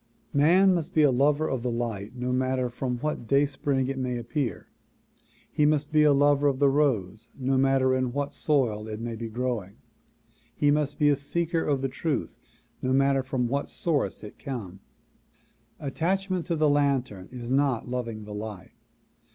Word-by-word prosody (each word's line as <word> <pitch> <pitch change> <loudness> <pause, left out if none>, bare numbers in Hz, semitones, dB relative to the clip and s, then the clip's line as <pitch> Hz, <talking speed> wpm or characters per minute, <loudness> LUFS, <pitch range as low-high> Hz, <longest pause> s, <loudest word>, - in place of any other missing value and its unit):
Man 180 +7 +5
must 170 0 -3
be 155 - +5
a 145 - +5
lover 145 +4 +2
of 130 -3 -2
the 125 - -1
light 115 -2 -4
no 125 0 -2
matter 130 -1 0
from 125 0 -3
what 150 -6 -3
day 140 +3 +4
spring 135 -1 -1
it 135 0 -3
may 125 -1 -2
appear. 120 - -3 0.9
He 150 - +1
must 150 -1 +2
be 155 0 +4
a 150 -1 +6
lover 145 0 +4
of 135 -2 +1
the 140 0 +4
rose 115 -7 0
no 135 0 0
matter 130 0 +3
in 130 -1 0
what 145 +2 -3
soil 120 -10 0
it 110 0 -5
may 115 0 -4
be 115 0 -5
growing. 115 -4 -3 0.8
He 145 -1 +3
must 145 -1 0
be 150 - +4
a 145 - +4
seeker 165 +4 -1
of 140 -2 0
the - - +2
truth 145 +2 -3 0.5
no 130 - 0
mat 135 +1 +4
ter 135 - +1
from 130 -1 -1
what 140 +4 -2
source 155 -9 -1
it 105 - -10
come. 105 -9 -6 1.0
Attachment 180 +6 -1
to 170 - 0
the 155 -1 +2
lantern 135 -9 0
is 120 -1 -6
not 135 -4 +1
loving 115 -3 -4
the 105 0 -8
light. 105 -3 -7
135 Hz, 185 wpm, -27 LUFS, 120-145 Hz, 1.0 s, a